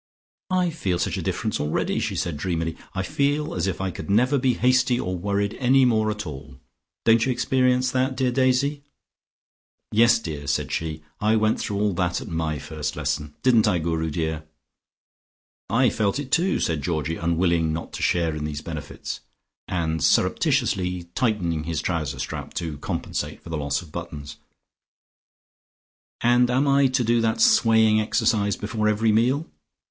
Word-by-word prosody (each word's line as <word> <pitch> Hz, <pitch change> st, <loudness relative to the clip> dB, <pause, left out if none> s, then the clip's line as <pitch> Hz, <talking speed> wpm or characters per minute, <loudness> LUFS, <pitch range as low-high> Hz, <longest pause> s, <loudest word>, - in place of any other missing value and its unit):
"I 180 Hz, -2 st, +1 dB
feel 95 Hz, -, -1 dB
such -, -, -1 dB
a -, -, -2 dB
difference -, -, -2 dB
already," 75 Hz, +1 st, -1 dB
she -, -, -2 dB
said 85 Hz, -3 st, -2 dB
dreamily. 80 Hz, +1 st, -2 dB, 0.2 s
"I 95 Hz, -, -1 dB
feel 145 Hz, +8 st, 0 dB
as 90 Hz, +1 st, -1 dB
if 95 Hz, -, -2 dB
I 95 Hz, -1 st, -2 dB
could 80 Hz, -, -8 dB
never 125 Hz, +7 st, +3 dB
be 125 Hz, -1 st, +2 dB
hasty 125 Hz, 0 st, +3 dB
or 90 Hz, 0 st, -2 dB
worried 100 Hz, +3 st, -1 dB
any 130 Hz, +1 st, +4 dB
more 110 Hz, -3 st, +2 dB
at 105 Hz, -1 st, -4 dB
all. 70 Hz, -3 st, -9 dB, 0.5 s
Don't 115 Hz, 0 st, +5 dB
you 130 Hz, -, +1 dB
experience 125 Hz, 0 st, +2 dB
that, 130 Hz, +1 st, 0 dB
dear 130 Hz, -2 st, +1 dB
Daisy?" 135 Hz, +3 st, +1 dB, 1.1 s
"Yes, 115 Hz, +2 st, +5 dB
dear," 75 Hz, -9 st, -6 dB
said 70 Hz, -, -1 dB
she. 80 Hz, -1 st, -3 dB, 0.2 s
"I 110 Hz, +1 st, +2 dB
went 110 Hz, 0 st, +2 dB
through 100 Hz, -1 st, -2 dB
all 105 Hz, -1 st, +1 dB
that 90 Hz, 0 st, 0 dB
at -, -, -8 dB
my 80 Hz, -4 st, -2 dB
first 75 Hz, +1 st, -5 dB
lesson. 75 Hz, 0 st, -3 dB
Didn't 115 Hz, -4 st, +4 dB
I, 95 Hz, -4 st, +2 dB
Guru 80 Hz, -1 st, -1 dB
dear?" 80 Hz, 0 st, -3 dB, 1.2 s
"I 120 Hz, +4 st, +3 dB
felt 105 Hz, +2 st, 0 dB
it 140 Hz, -2 st, -5 dB
too," 180 Hz, +6 st, +2 dB
said 80 Hz, -3 st, -1 dB
Georgie, 80 Hz, +1 st, -2 dB
unwilling 85 Hz, -1 st, +1 dB
not 80 Hz, +1 st, -5 dB
to -, -, -5 dB
share 85 Hz, -3 st, +1 dB
in 75 Hz, -, -4 dB
these 75 Hz, -1 st, -4 dB
benefits, 75 Hz, -3 st, -6 dB, 0.5 s
and 80 Hz, -4 st, -1 dB
surreptitiously 90 Hz, -2 st, +1 dB
tightening 90 Hz, -, 0 dB
his 80 Hz, -2 st, -2 dB
trouser 80 Hz, -5 st, -2 dB
strap -, -, -6 dB
to 80 Hz, -4 st, -4 dB
compensate -, -, -4 dB
for 85 Hz, -, -9 dB
the -, -, -2 dB
loss 70 Hz, +3 st, -1 dB
of 80 Hz, -, -16 dB
buttons. 75 Hz, -4 st, -7 dB, 1.8 s
"And 120 Hz, +1 st, +4 dB
am 130 Hz, +3 st, +2 dB
I 140 Hz, 0 st, +4 dB
to 130 Hz, -1 st, 0 dB
do 115 Hz, 0 st, +2 dB
that 110 Hz, -1 st, 0 dB
swaying 110 Hz, -, +5 dB
exercise 105 Hz, -1 st, +1 dB
before 105 Hz, 0 st, -2 dB
every 110 Hz, +1 st, +2 dB
meal?" 125 Hz, +8 st, +2 dB
100 Hz, 170 wpm, -24 LUFS, 80-125 Hz, 1.8 s, Don't